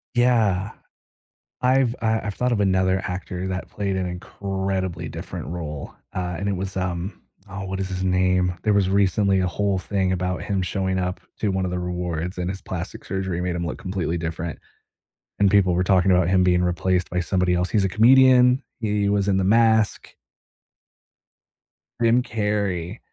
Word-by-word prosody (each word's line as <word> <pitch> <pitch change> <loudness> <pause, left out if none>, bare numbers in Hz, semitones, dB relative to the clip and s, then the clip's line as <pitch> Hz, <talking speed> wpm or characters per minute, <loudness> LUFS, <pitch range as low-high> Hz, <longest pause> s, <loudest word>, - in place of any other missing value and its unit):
Yeah. 110 -5 +2 0.9
I've 130 -1 +3
I 110 0 +1
I've 100 - -3
thought 125 0 0
of 105 - +1
another 95 -1 +2
actor 90 0 -4
that 95 0 -4
played 100 -2 -2
an 95 - -1
incredibly 95 -1 -3
different - - -7
role, 75 -4 -6 0.2
uh, 90 -1 -3
and 100 - -2
it 100 - 0
was, 95 +1 -5
um 90 +1 -3 0.3
oh, 95 0 -6
what 95 0 -4
is 95 - -2
his 95 -1 -4
name? 90 -1 +2
There 105 - +3
was 100 -2 +3
recently 100 0 +2
a 90 - +1
whole 100 +1 0
thing 95 -1 -1
about 90 0 -2
him 100 -2 -1
showing 95 +1 -1
up 90 0 -2 0.2
to 105 - +1
one 95 0 -1
of 90 - -2
the 90 - -2
rewards 90 -1 -3
and 90 0 -2
his 95 0 -6
plastic 90 -1 -6
surgery 95 -3 -3
made 90 0 -1
him 85 0 -2
look - - -4
completely 90 -3 -2
different 80 0 -4 0.8
and 100 -1 +5
people 95 -2 +4
were 90 +1 +1
talking 95 0 +3
about 90 -1 +3
him 95 0 +3
being 90 -1 +3
replaced 90 0 0
by 90 0 -1
somebody 90 0 +1
else. 90 +1 0
He's 105 -3 +2
a - - 0
comedian. 125 - +6 0.2
He 105 -2 0
was 100 -1 +1
in 95 - +2
The 95 - +1
Mask. 110 +1 +3 1.9
Jim 120 +2 +4
Carrey. 105 -4 -2
95 Hz, 180 wpm, -23 LUFS, 90-100 Hz, 1.9 s, comedian